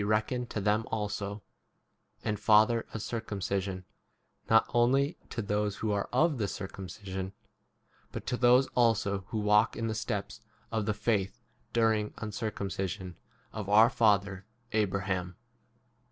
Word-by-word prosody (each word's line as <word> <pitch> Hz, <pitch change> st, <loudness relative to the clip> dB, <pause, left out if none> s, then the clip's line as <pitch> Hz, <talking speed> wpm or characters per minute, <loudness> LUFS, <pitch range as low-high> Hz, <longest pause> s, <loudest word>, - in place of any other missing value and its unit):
12 110 Hz, +4 st, 0 dB
to -, -, -3 dB
them 105 Hz, +2 st, +2 dB
also; 105 Hz, -1 st, -3 dB, 0.8 s
7 -, -, -3 dB
and 105 Hz, -1 st, -1 dB
father 110 Hz, +2 st, +4 dB
of 110 Hz, -, -5 dB
cir 115 Hz, -1 st, -3 dB
cumcision, 95 Hz, -3 st, -3 dB, 0.7 s
not 110 Hz, 0 st, +6 dB
only 135 Hz, +6 st, +3 dB
to 115 Hz, -, -3 dB
those 105 Hz, 0 st, 0 dB
who 105 Hz, +1 st, -2 dB
are 100 Hz, -1 st, -1 dB
of 155 Hz, -5 st, +2 dB
[the] 105 Hz, -, 0 dB
circumcision, 95 Hz, 0 st, -6 dB, 0.8 s
but -, -, -6 dB
to -, -, -1 dB
those 125 Hz, +2 st, +5 dB
also 100 Hz, -5 st, +1 dB
who 110 Hz, -, -4 dB
walk 105 Hz, +1 st, +3 dB
in 115 Hz, -, -2 dB
the 110 Hz, -, -1 dB
steps 110 Hz, -, -4 dB, 0.3 s
of 110 Hz, -2 st, -1 dB
the 105 Hz, -, +2 dB
faith, 105 Hz, 0 st, 0 dB, 0.3 s
during 110 Hz, -2 st, +2 dB
uncircumci 105 Hz, -3 st, -3 dB
sion, 90 Hz, -1 st, -7 dB, 0.4 s
of 105 Hz, -3 st, -5 dB
our 110 Hz, +3 st, +7 dB
father 100 Hz, -3 st, +2 dB, 0.3 s
Abraham. 95 Hz, -4 st, -1 dB
105 Hz, 140 wpm, -30 LUFS, 100-115 Hz, 0.8 s, our